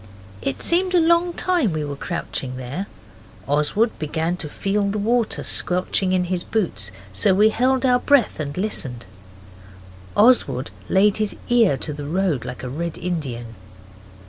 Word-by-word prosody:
It 135 Hz, -, -3 dB
seemed 365 Hz, +2 st, +2 dB
a -, -, +6 dB
long 340 Hz, +1 st, +3 dB
time 340 Hz, -, 0 dB
we 155 Hz, -1 st, -2 dB
were 145 Hz, -1 st, -5 dB
crouching 140 Hz, -5 st, -4 dB
there. 135 Hz, +10 st, -5 dB, 0.6 s
Oswald 150 Hz, -, +2 dB
began 160 Hz, +3 st, -1 dB
to 155 Hz, -4 st, -6 dB
feel 200 Hz, +5 st, -1 dB
the 205 Hz, -, -2 dB
water 230 Hz, +2 st, 0 dB
squelching 180 Hz, +1 st, +2 dB
in 185 Hz, -1 st, +2 dB
his 180 Hz, 0 st, -2 dB
boots, 170 Hz, -, -1 dB, 0.2 s
so 100 Hz, -, +3 dB
we 210 Hz, +3 st, +5 dB
held 255 Hz, +3 st, +1 dB
our 250 Hz, -1 st, +4 dB
breath 275 Hz, -8 st, +2 dB
and 145 Hz, 0 st, -4 dB
listened. 130 Hz, -, -3 dB, 1.1 s
Oswald 205 Hz, -, +4 dB, 0.2 s
laid 200 Hz, +2 st, +4 dB
his 215 Hz, -1 st, -1 dB
ear 230 Hz, -, +4 dB
to 150 Hz, -, -5 dB
the 145 Hz, 0 st, -7 dB
road 170 Hz, -6 st, 0 dB
like 125 Hz, 0 st, -7 dB
a -, -, -4 dB
Red 165 Hz, +6 st, -4 dB
Indian. 135 Hz, -10 st, -4 dB
180 Hz, 155 wpm, -22 LUFS, 145-225 Hz, 1.1 s, a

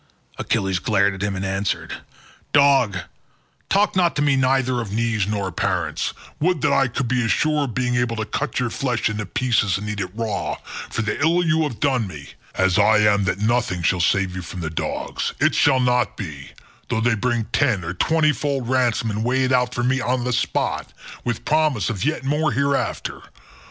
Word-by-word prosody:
Achilles 95 Hz, -1 st, 0 dB
glared 100 Hz, -2 st, +2 dB
at 95 Hz, -, -8 dB
him 100 Hz, -1 st, -1 dB
and 95 Hz, +1 st, -3 dB
answered, 95 Hz, +1 st, -2 dB, 0.6 s
"Dog, 135 Hz, -8 st, +4 dB, 0.7 s
talk 200 Hz, 0 st, +2 dB
not 175 Hz, -2 st, +2 dB
to 145 Hz, -, +1 dB
me 140 Hz, -2 st, +3 dB
neither 130 Hz, -1 st, +1 dB
of 110 Hz, -4 st, -6 dB
knees 110 Hz, -2 st, 0 dB
nor 100 Hz, -3 st, -2 dB
parents; 90 Hz, -5 st, -1 dB, 0.3 s
would 175 Hz, -1 st, +1 dB
that 140 Hz, -, +2 dB
I 135 Hz, -, +3 dB
could 125 Hz, +1 st, -3 dB
be 125 Hz, 0 st, +1 dB
as 115 Hz, -, -1 dB
sure 150 Hz, -2 st, +1 dB
of 120 Hz, -, -7 dB
being 125 Hz, -1 st, 0 dB
able 120 Hz, -1 st, 0 dB
to 110 Hz, -1 st, -3 dB
cut 150 Hz, +6 st, -2 dB
your 125 Hz, -2 st, -1 dB
flesh 125 Hz, -5 st, -1 dB
into 105 Hz, -2 st, -4 dB
pieces 115 Hz, -6 st, +1 dB
and 105 Hz, +2 st, -6 dB
eat 105 Hz, -1 st, -3 dB
it 95 Hz, -2 st, -2 dB
raw, 115 Hz, -2 st, -2 dB, 0.3 s
for 110 Hz, -, -2 dB
the 105 Hz, +6 st, -2 dB
ill 170 Hz, +3 st, +3 dB
you 160 Hz, -1 st, +2 dB
have 150 Hz, -8 st, -2 dB
done 130 Hz, -6 st, +1 dB
me, 75 Hz, -6 st, -10 dB, 0.3 s
as 95 Hz, +2 st, +2 dB
I 110 Hz, +1 st, +5 dB
am 105 Hz, -2 st, +3 dB
that 90 Hz, -, 0 dB
nothing 110 Hz, -6 st, 0 dB
shall 90 Hz, +2 st, +2 dB
save 95 Hz, +1 st, +1 dB
you 90 Hz, -, -4 dB
from 90 Hz, +1 st, -7 dB
the 80 Hz, -1 st, -3 dB
dogs—it 80 Hz, -, -1 dB
shall 135 Hz, -3 st, +4 dB
not 125 Hz, -3 st, +1 dB
be, 75 Hz, -8 st, -7 dB, 0.4 s
though 110 Hz, -, 0 dB
they 120 Hz, 0 st, +3 dB
bring 120 Hz, +1 st, 0 dB
ten 120 Hz, -10 st, +2 dB
or 85 Hz, +2 st, -4 dB
twenty 150 Hz, -, +2 dB
fold 140 Hz, -4 st, -2 dB
ransom 120 Hz, -3 st, +1 dB
and 105 Hz, +1 st, -2 dB
weigh 130 Hz, +2 st, +1 dB
it 130 Hz, -, 0 dB
out 125 Hz, -1 st, +2 dB
for 120 Hz, -, -1 dB
me 130 Hz, +1 st, +1 dB
on 125 Hz, 0 st, 0 dB
the 125 Hz, 0 st, -1 dB
spot, 130 Hz, +2 st, -1 dB, 0.3 s
with 120 Hz, -2 st, -3 dB
promise 150 Hz, -, +1 dB
of 100 Hz, -5 st, -4 dB
yet 155 Hz, -1 st, -1 dB
more 150 Hz, +3 st, +1 dB
hereafter. 140 Hz, +1 st, -1 dB
120 Hz, 200 wpm, -22 LUFS, 100-135 Hz, 0.7 s, I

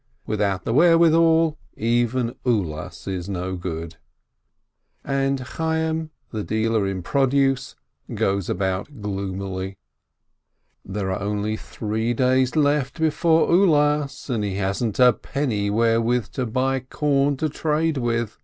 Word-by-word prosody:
Without 100 Hz, -3 st, -1 dB
the 115 Hz, -, 0 dB
wherewithal, 165 Hz, 0 st, +4 dB, 0.2 s
even 120 Hz, +1 st, +1 dB
Ulas 90 Hz, -6 st, -2 dB
is 95 Hz, -1 st, -4 dB
no 95 Hz, -1 st, -3 dB
good! 85 Hz, -2 st, -5 dB, 1.1 s
And 135 Hz, 0 st, 0 dB
Chayyim, 160 Hz, +4 st, -2 dB, 0.2 s
the 110 Hz, -2 st, -3 dB
dealer 110 Hz, -1 st, 0 dB
in 95 Hz, -2 st, -3 dB
produce, 135 Hz, +2 st, +1 dB, 0.4 s
goes 100 Hz, -2 st, 0 dB
about 95 Hz, +8 st, -2 dB
gloomily. 95 Hz, -1 st, -4 dB, 1.1 s
There 95 Hz, 0 st, -3 dB
are 95 Hz, -, -3 dB
only 105 Hz, +1 st, -1 dB
three 110 Hz, +2 st, -3 dB
days 130 Hz, +2 st, +2 dB
left 145 Hz, -1 st, +1 dB
before 160 Hz, +1 st, +3 dB
Ulas, 150 Hz, -5 st, +2 dB
and 120 Hz, -6 st, -1 dB
he 100 Hz, -2 st, -2 dB
hasn't 100 Hz, +3 st, -1 dB
a 125 Hz, -1 st, +6 dB
penny 110 Hz, -6 st, -2 dB
wherewith 115 Hz, +2 st, +1 dB
to 130 Hz, -2 st, -2 dB
buy 130 Hz, +4 st, 0 dB
corn 140 Hz, +1 st, 0 dB
to 155 Hz, -, 0 dB
trade 155 Hz, +1 st, 0 dB
with. 115 Hz, -3 st, -2 dB
120 Hz, 120 wpm, -23 LUFS, 100-145 Hz, 1.1 s, a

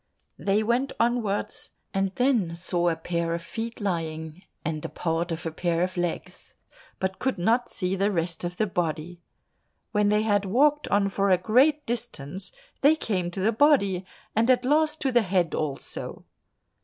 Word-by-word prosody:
They 205 Hz, +2 st, +2 dB
went 240 Hz, +5 st, +1 dB
onwards, 230 Hz, -4 st, -1 dB, 0.2 s
and 195 Hz, 0 st, +1 dB
then 235 Hz, -10 st, +2 dB
saw 175 Hz, 0 st, +1 dB
a 165 Hz, -, 0 dB
pair 170 Hz, 0 st, -2 dB
of 170 Hz, -, -5 dB
feet 225 Hz, +6 st, -5 dB
lying 160 Hz, -4 st, -3 dB, 0.2 s
and 155 Hz, -1 st, -2 dB
part 170 Hz, +1 st, -1 dB
of 165 Hz, +1 st, -4 dB
a 165 Hz, -, -2 dB
pair 170 Hz, +1 st, 0 dB
of 185 Hz, 0 st, -2 dB
legs, 175 Hz, -2 st, -4 dB, 0.4 s
but 190 Hz, 0 st, -2 dB
could 265 Hz, 0 st, 0 dB
not 230 Hz, +7 st, +2 dB
see 185 Hz, -1 st, -1 dB
the 195 Hz, +2 st, +2 dB
rest 170 Hz, -2 st, -1 dB
of 175 Hz, 0 st, -4 dB
the 215 Hz, -, +2 dB
body. 175 Hz, -2 st, -3 dB, 0.7 s
When 210 Hz, -1 st, +2 dB
they 210 Hz, +1 st, +3 dB
had 205 Hz, -2 st, +2 dB
walked 290 Hz, +9 st, +3 dB
on 200 Hz, 0 st, +2 dB
for 195 Hz, +1 st, +1 dB
a 185 Hz, -, +5 dB
great 265 Hz, -, +3 dB
distance, 195 Hz, -, -4 dB, 0.3 s
they 290 Hz, +3 st, +6 dB
came 185 Hz, -, -1 dB
to 180 Hz, +2 st, -5 dB
the 215 Hz, +4 st, +3 dB
body, 215 Hz, -8 st, +3 dB, 0.3 s
and 225 Hz, +3 st, +3 dB
at 250 Hz, -1 st, +4 dB
last 305 Hz, +2 st, +2 dB
to 270 Hz, -, +1 dB
the 240 Hz, -1 st, +5 dB
head 180 Hz, -5 st, +1 dB
also. 145 Hz, -3 st, -4 dB
195 Hz, 170 wpm, -26 LUFS, 175-235 Hz, 0.7 s, they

